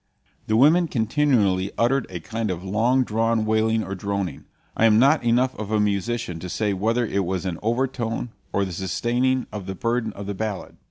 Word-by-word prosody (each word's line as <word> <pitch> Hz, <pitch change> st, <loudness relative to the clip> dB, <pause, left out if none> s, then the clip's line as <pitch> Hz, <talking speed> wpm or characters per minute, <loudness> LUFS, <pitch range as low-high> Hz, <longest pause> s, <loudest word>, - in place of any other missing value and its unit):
The 110 Hz, -, +2 dB
women 160 Hz, +7 st, +5 dB
continually 110 Hz, -7 st, +1 dB
uttered 125 Hz, +3 st, +2 dB
a 90 Hz, -2 st, -5 dB
kind 110 Hz, +6 st, -3 dB
of 90 Hz, -1 st, -4 dB
long 115 Hz, +7 st, +2 dB
drawn 115 Hz, -1 st, 0 dB
wailing 110 Hz, 0 st, +1 dB
or 95 Hz, -, -5 dB
droning; 100 Hz, -1 st, -3 dB, 0.3 s
I 115 Hz, -, +3 dB
am 110 Hz, -1 st, +5 dB
not 140 Hz, +5 st, +4 dB
enough 125 Hz, +2 st, +2 dB
of 105 Hz, -2 st, -5 dB
a 110 Hz, -1 st, +1 dB
musician 105 Hz, -2 st, -1 dB
to 90 Hz, -, -7 dB
say 105 Hz, +2 st, 0 dB
whether 115 Hz, +5 st, +1 dB
it 100 Hz, -2 st, -1 dB
was 95 Hz, 0 st, -3 dB
an 90 Hz, -3 st, -3 dB
overtone 120 Hz, 0 st, -1 dB, 0.2 s
or 100 Hz, -, +1 dB
the 95 Hz, -, -6 dB
sustaining 120 Hz, +8 st, 0 dB
of 100 Hz, -3 st, -6 dB
the 95 Hz, -, -4 dB
burden 115 Hz, +1 st, -1 dB
of 100 Hz, -, -8 dB
the 100 Hz, -, -3 dB
ballad. 105 Hz, 0 st, -5 dB
110 Hz, 195 wpm, -23 LUFS, 100-120 Hz, 0.3 s, women